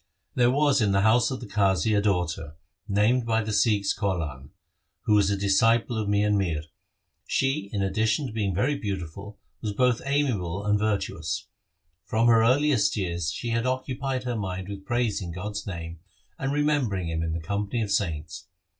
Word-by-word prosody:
There 120 -1 +3
was 140 0 +3
in 100 -2 +2
the 95 - +3
house 110 +3 +4
of 130 -1 -5
the - - -6
Qazi 105 0 +2
a 100 - +3
daughter, 90 -6 -1 0.3
named 110 +5 +2
by 115 -1 +1
the 110 0 -3
Sikhs 105 -3 +2
Kaulan, 100 -3 -1 0.2
1 65 - -15 0.5
who 105 - +2
was 100 -2 +4
a 100 - 0
disciple 115 +5 +2
of 110 -2 -2
Mian 105 0 +2
Mir. 80 -6 -1 0.6
She, 135 -7 0
in 100 -1 -1
addition 110 +6 +1
to 120 - -6
being 100 -5 -1
very 130 +9 +1
beautiful, 100 - -5 0.2
was 105 -2 -3
both 125 +1 +2
amiable 110 -10 -1
and 105 0 +2
virtuous. 100 -5 -2 0.6
From 110 +1 +1
her 115 -1 +6
earliest 125 -3 +3
years 85 -4 -1
she 120 +8 -4
had 115 +2 0
occupied 130 0 -2
her 125 -1 -2
mind 95 -2 -4
with 100 -1 -7
praising 115 -7 -1
God's 100 +4 -5
name 85 -3 -6 0.4
and 135 0 -1
remembering 140 - 0
Him 80 0 -2
in 80 -1 -2
the 85 - -2
company 100 +7 -2
of 100 - -4
saints. 80 -6 -2
105 Hz, 180 wpm, -26 LUFS, 95-120 Hz, 0.6 s, her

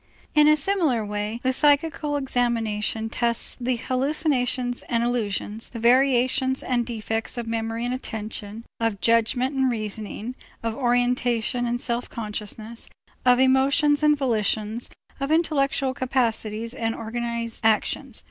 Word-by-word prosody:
In 300 -1 +6
a 305 0 +6
similar 300 - +2
way 210 +2 -3
the 260 0 +2
psychical 295 +1 +2
examination 230 -4 -1
tests 235 0 -1
the 250 +1 +1
hallucinations 255 -1 0
and 235 -1 +1
illusions, 225 -2 -2
the 235 - -8
variations 260 +2 +3
and 240 -2 0
defects 225 0 -3
of 240 - -3
memory 225 +1 -2
and 245 - -1
attention, 220 -2 -6
of 225 -3 0
judgment 230 +4 +2
and 265 -1 +2
reasoning, 220 +1 -3 0.3
of 225 -1 -2
orientation 245 -1 +1
and 240 +1 -1
self 240 0 -1
consciousness, 220 +1 -5 0.4
of 250 0 +7
emotions 275 +3 +4
and 300 -1 +4
volitions, 220 -3 -1 0.3
of 275 +2 -2
intellectual 280 -5 +1
capacities 230 -3 -1
and 225 -3 -2
organized 235 0 -3
actions. 225 +3 +1
240 Hz, 130 wpm, -24 LUFS, 225-265 Hz, 0.4 s, of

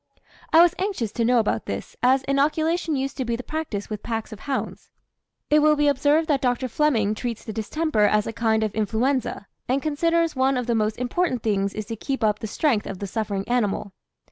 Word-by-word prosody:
I 330 +1 +8
was 350 -1 +4
anxious 370 - -2
to 235 - -1
know 245 +2 +3
about 210 - 0
this, 100 - -5
as 260 +2 +4
inoculation 310 +4 +1
used 270 0 -3
to 265 - -1
be 235 -1 -1
the 250 - -6
practice 300 -11 -4
with 210 -2 -5
packs 225 -1 -4
of 210 - -10
hounds. 275 +2 -4 0.6
It 300 - +6
will 305 0 +5
be 295 0 +2
observed 290 +3 +3
that 285 -4 +1
Dr. 250 0 0
Fleming 230 -6 +1
treats 230 0 -5
the 220 - -5
distemper 225 +1 0
as 210 0 +2
a 225 - -4
kind 220 -1 +1
of 215 -2 -2
influenza, 225 +2 -1 0.2
and 260 +2 +2
considers 330 +2 +1
one 265 0 +2
of 250 - -2
the 240 - 0
most 215 -1 0
important 250 +2 -1
things 200 -2 0
is 215 - -4
to 225 +2 -5
keep 270 +3 -3
up 210 -1 +2
the 220 - -4
strength 230 -1 0
of 195 - -5
the 200 - -5
suffering 200 -1 -3
animal. 210 -5 -1
245 Hz, 215 wpm, -24 LUFS, 215-290 Hz, 0.6 s, I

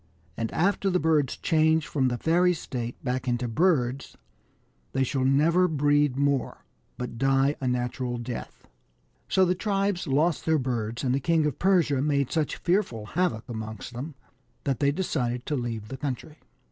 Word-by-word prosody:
And 115 -1 -3
after 195 +3 +1
the 180 -1 +2
birds 150 -4 +1
change 160 -1 +2
from 135 -3 0
the 120 -1 -1
fairy 175 +5 +3
state 120 -6 -5
back 130 0 -2
into 120 0 0
birds, 135 -2 +1 0.8
they 135 - +2
shall 130 0 -1
never 160 +7 +4
breed 145 -3 +2
more, 140 -1 0 0.3
but 125 -2 -5
die 135 +2 +3
a 130 - -1
natural 125 0 -1
death." 120 0 -7 0.6
So 190 - +4
the 180 - +2
tribes 195 -1 -1
lost 150 +4 +1
their 160 0 +4
birds, 120 -3 -2
and 125 -2 +1
the 135 - +1
King 160 +2 +2
of 150 -4 -2
Persia 175 -8 +3
made 140 -2 +1
such 155 -3 0
fearful 175 - 0
havoc 175 -10 0
amongst 110 0 -6
them 135 +5 -6 0.5
that 135 -4 -1
they 140 0 +3
decided 125 -7 -2
to 150 - -1
leave 115 -4 -4
the 135 - -6
country. 145 +3 -5
140 Hz, 165 wpm, -27 LUFS, 125-160 Hz, 0.8 s, never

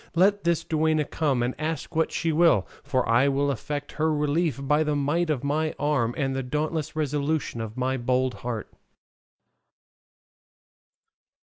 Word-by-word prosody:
Let 200 +2 +3
this 170 -1 +2
duenna 155 -1 +1
come 140 -5 0
and 125 +1 -1
ask 155 -1 -3
what 160 0 +2
she 165 - 0
will, 160 - +4 0.2
for 135 -3 0
I 120 +4 +4
will 140 +1 +1
effect 145 +3 -4
her 160 +1 0
relief 150 -1 0
by 150 +3 +2
the 150 -1 0
might 150 +4 0
of 145 -4 -1
my 155 +2 0
arm 140 -6 0
and 135 -2 -1
the 135 - -1
dauntless 150 +4 -2
resolution 150 -4 -1
of 110 +1 -6
my 130 +1 0
bold 130 +1 +1
heart." 120 -3 -5
145 Hz, 150 wpm, -26 LUFS, 130-155 Hz, 0.2 s, will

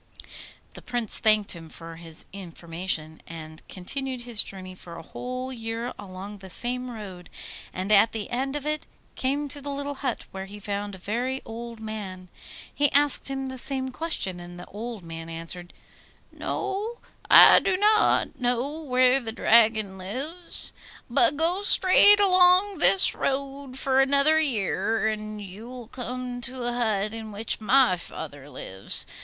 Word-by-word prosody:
The - - -10
Prince 240 -4 -3
thanked 215 -2 +4
him 165 -2 -8
for 165 +1 -10
his 165 -1 -3
information, 170 -3 -4
and 155 -1 -10
continued 260 +7 -3
his 240 -3 0
journey 185 -1 -8
for 175 -2 -12
a 165 - -9
whole 255 +7 -6
year 230 +1 -4
along 200 +1 -9
the 190 0 -11
same 250 +5 +1
road, 195 -6 -9 0.4
and 185 +3 -4
at 210 +2 +6
the 220 -2 -4
end 265 +3 -2
of 295 -1 -4
it 305 0 -2 0.3
came 280 +3 -1
to 285 +1 -4
the 285 - -6
little 285 0 -3
hut, 270 -3 -3
where 190 0 -6
he 205 +2 -10
found 205 0 -4
a - - -11
very 240 +8 -2
old 230 0 -8
man. 200 -4 -7 0.4
He 290 -1 +2
asked 290 -1 +3
him 270 0 -3
the 260 -1 -6
same 260 0 -1
question, 255 - -2
and 175 0 -10
the 180 - -8
old 220 -1 -7
man 165 0 -8
answered, 165 +2 -6 0.6
'No, 410 +4 -3 0.3
I - - +10
do 380 -2 0
not 430 -4 +3
know 250 +5 -1
where 255 -2 +3
the 230 -4 -5
Dragon 220 -4 +3
lives. 280 - -3 0.4
But 280 +3 +3
go 340 +5 +1
straight 410 +1 +7
along 370 0 +4
this 380 +3 +6
road 275 -1 -3
for 270 0 +2
another 280 +3 +4
year, 225 -5 +1
and 215 -1 -4
you 205 +4 -9
will 250 -2 -9
come 250 0 -5
to 255 +1 -6
a 240 0 -1
hut 215 -3 0
in 220 -1 -7
which 215 +2 -2
my 245 -3 +4
father 145 -4 -9
lives. 95 -8 +3
235 Hz, 160 wpm, -25 LUFS, 190-270 Hz, 0.6 s, I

